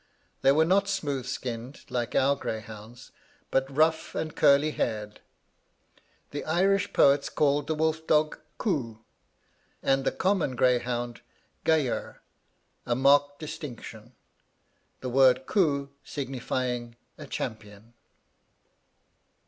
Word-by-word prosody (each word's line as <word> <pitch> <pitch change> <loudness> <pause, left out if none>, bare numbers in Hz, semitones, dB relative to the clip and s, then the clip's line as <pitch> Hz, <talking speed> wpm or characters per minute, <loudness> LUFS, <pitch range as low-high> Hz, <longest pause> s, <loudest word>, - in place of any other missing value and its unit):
They 135 - +5
were 155 +3 +4
not 195 +3 +3
smooth 145 -10 -2
skinned, 125 0 -5
like 120 -1 -2
our 140 +2 +4
greyhounds, 110 -1 -7 0.4
but 135 0 +1
rough 155 +3 +1
and 155 - -3
curly 145 +1 +4
haired. 105 -6 -3 1.1
The 145 - -4
Irish 195 +5 +2
poets 140 0 +4
call 145 -1 +2
the 155 +1 -3
wolf 160 +1 -1
dog 155 0 +2 0.2
'Cu,' 130 - -2 0.9
and 135 0 +2
the - - +1
common 185 -9 0
greyhound 120 -1 0 0.4
'Gayer;' 155 -6 0 0.7
a 120 - +1
marked 145 +2 +4
distinction, 125 -6 -8 0.9
the 130 - -3
word 130 0 +4
'Cu' 140 -8 +1
signifying 125 -3 -3 0.2
a - - -8
champion.' 110 +1 -6
135 Hz, 110 wpm, -27 LUFS, 120-155 Hz, 1.1 s, They